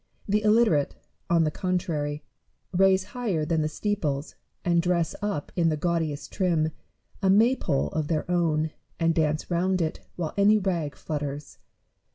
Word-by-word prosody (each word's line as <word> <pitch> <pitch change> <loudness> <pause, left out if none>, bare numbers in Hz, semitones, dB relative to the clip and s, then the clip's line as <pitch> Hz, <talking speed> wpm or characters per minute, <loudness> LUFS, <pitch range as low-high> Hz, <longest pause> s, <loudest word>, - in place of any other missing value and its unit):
The 210 +1 +2
illiterate, 215 -9 +3 0.3
on 170 -1 +4
the 155 - +1
contrary, 155 -5 -2 0.5
raise 190 0 +4
higher 205 -11 -1
than 160 0 +1
the 155 - +1
steeples, 155 -5 -2 0.3
and 170 -1 +3
dress 170 -2 +1
up 205 -8 -3
in 170 -2 +3
the 155 - 0
gaudiest 155 -3 -1
trim, 165 -5 +1 0.5
a 195 - +2
maypole 205 - +3
of 155 -2 -2
their 155 -1 0
own, 160 -3 +1 0.3
and 165 -1 +3
dance 155 +1 0
round 185 +2 +1
it 160 -1 -1 0.2
while 165 -3 -3
any 205 +2 +5
rag 170 -8 -1
flutters. 145 -1 -5
170 Hz, 150 wpm, -26 LUFS, 155-190 Hz, 0.5 s, any